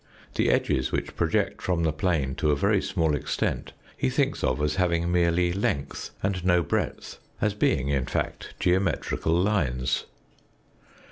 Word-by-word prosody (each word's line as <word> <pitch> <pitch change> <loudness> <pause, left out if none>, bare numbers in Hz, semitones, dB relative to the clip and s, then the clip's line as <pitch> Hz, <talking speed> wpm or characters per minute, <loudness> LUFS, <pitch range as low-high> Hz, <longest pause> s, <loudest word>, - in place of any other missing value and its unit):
The - - +2
edges 65 - +1
which - - -3
project - - 0
from 90 -2 0
the 80 -2 +1
plane 75 -5 0
to 75 - +1
a 75 - +4
very 100 +6 +2
small 80 -5 0
extent 75 - -2 0.2
he 65 - 0
thinks - - 0
of 65 +1 +1
as 75 +2 0
having 85 -2 +1
merely 85 0 +2
length 75 -7 -2
and 95 -2 -1
no 90 -1 +3
breadth 70 - -3 0.2
as 105 -1 +1
being, 70 -9 +1
in 70 -3 0
fact, - - -3
geometrical 90 -2 +1
lines. 75 -11 0
85 Hz, 150 wpm, -26 LUFS, 75-90 Hz, 0.2 s, a